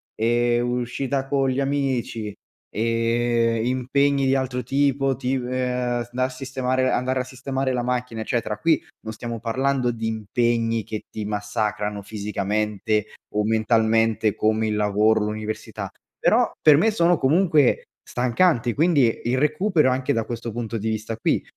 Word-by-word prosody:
ehm, 120 +1 +2
uscita 130 +2 -2
con 135 -1 +1
gli 130 - -1
amici, 130 -6 -1 0.4
ehm, 115 0 +1
impegni 135 +2 +1
di 135 - +3
altro 130 -1 -1
tipo, 135 0 +1
tip 130 0 -2
eh, 125 -1 -1
s 120 - -16
da 130 +1 0
sistemare 130 0 -1
andare 130 +1 0
a - - -3
sistemare 130 +1 -3
la 125 - 0
macchina 125 -2 -2
eccetera. 110 -2 -2
Qui 165 -1 +3 0.2
non 110 - -6
stiamo 115 +1 -6
parlando 130 +3 0
di 115 -1 -5
impegni 115 +1 0
che 110 +1 -5
ti 105 -1 -5
massacrano 105 0 -2
fisicamente 105 0 -1 0.3
o 105 0 +1
mentalmente 110 0 +2
come 110 +1 +1
il 105 - -1
lavoro, 105 +1 +2
l'università. 110 +1 -4 0.3
Però - - +3
per 150 -2 +7
me 220 +8 +4
sono 175 -4 +3
comunque 155 -1 +3 0.2
stancanti, 125 0 +1
quindi 145 -7 +2
il 125 +2 +1
recupero 155 0 +2
anche 130 0 0
da 115 -1 -1
questo 115 0 -5
punto 115 0 -4
di 110 +2 -2
vista 110 0 -3
qui 115 - 0
120 Hz, 145 wpm, -23 LUFS, 110-130 Hz, 0.4 s, per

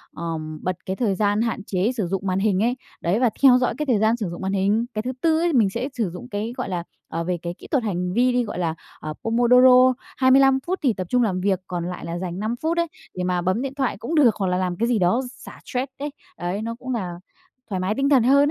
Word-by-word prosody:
ờm, 155 -2 -5
bật 185 -1 -1
cái 190 - -2
thời 205 -5 0
gian 205 +2 +1
hạn 230 -3 -2
chế 195 +5 0
sử 195 -5 0
dụng 195 +1 -3
màn 185 +1 +1
hình 200 0 +2
ấy, 245 +2 +1 0.3
đấy, 185 +7 +1
và 250 -3 +4
theo 255 -2 +8
dõi 250 - +1
cái 300 - -1
thời 240 -6 +2
gian 220 +2 +3
sử 205 -6 -3
dụng 175 - -7
màn 190 +1 -2
hình. 205 +4 +2
Cái 215 - -1
thứ 255 +3 -3
tư 320 -1 +3
ấy, 340 -2 +1
mình 220 -6 +4
sẽ 240 +7 -3
sử 225 -7 -1
dụng 180 +8 -9
cái, 215 +3 -3
gọi - - -3
là, 175 -2 -2 0.2
ờ, 165 +1 -3
về 180 0 -1
cái 170 0 -4
kỹ - - -12
thuật 270 -6 +2
hành 180 -3 -2
vi 250 +2 +3
đi 245 -1 +2
gọi 205 -5 -5
là, 165 -2 -1 0.2
à, 155 0 -5
Pomodoro, 250 +2 +6 0.2
25 265 0 +5
phút 375 +1 -1
thì 250 -5 +3
tập 185 -3 -5
trung 250 0 +3
làm 185 -4 0
việc, 190 -1 +1
còn 175 -2 -3
lại 180 - -6
là 170 +1 -4
dành 180 0 -4
5 220 +3 -1
phút 330 +2 0
ấy, 340 0 +2 0.3
để 180 - -2
mà 180 -1 0
bấm 185 +7 0
điện 275 0 -3
thoại 265 -7 -1
cũng 240 +10 -4
được, 260 -7 +5
hoặc 195 -2 -1
là 180 0 +1
làm 180 -1 -1
cái 230 - +1
gì 235 -4 +2
đó 185 +8 +3
xả - - -12
stress 260 +1 -3
đấy. 290 +1 -3 0.3
Ấy, 180 +4 -3
nó 230 +1 -4
cũng 260 0 -4
là 185 -6 -3 0.6
thoải 190 -2 -2
mái 190 +4 -1
tinh 275 +1 +1
thần 260 -5 +5
hơn 270 +3 +5
215 Hz, 275 wpm, -23 LUFS, 185-250 Hz, 0.6 s, theo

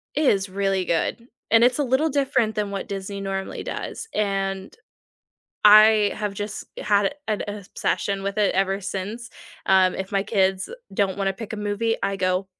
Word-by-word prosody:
it 300 +1 +1
is 195 -6 +2
really 195 0 0
good, 175 +8 -1 0.2
and 225 +1 +6
it's 245 +3 +3
a - - +3
little 265 +5 +2
different 260 -6 +1
than 205 -1 -2
what 195 - -4
Disney 200 0 -5
normally 195 0 -4
does, - - -5
and 195 -2 -2 0.9
I 215 0 +7
have 210 -2 -3
just 205 +1 -5
had 205 +2 +1
an 215 -2 -1
obsession 200 0 -2
with 200 +1 -3
it 205 -2 +2
ever 195 +1 +1
since, 205 +5 -5 0.4
um, 190 -1 +4
if 190 +1 -5
my 195 -1 +2
kids 190 -2 0 0.2
don't 195 -1 0
wanna 195 -1 +1
pick 220 +3 -8
a - - -4
movie, 210 +2 -1
I 195 - 0
go, 185 0 0
200 Hz, 170 wpm, -23 LUFS, 195-215 Hz, 0.9 s, I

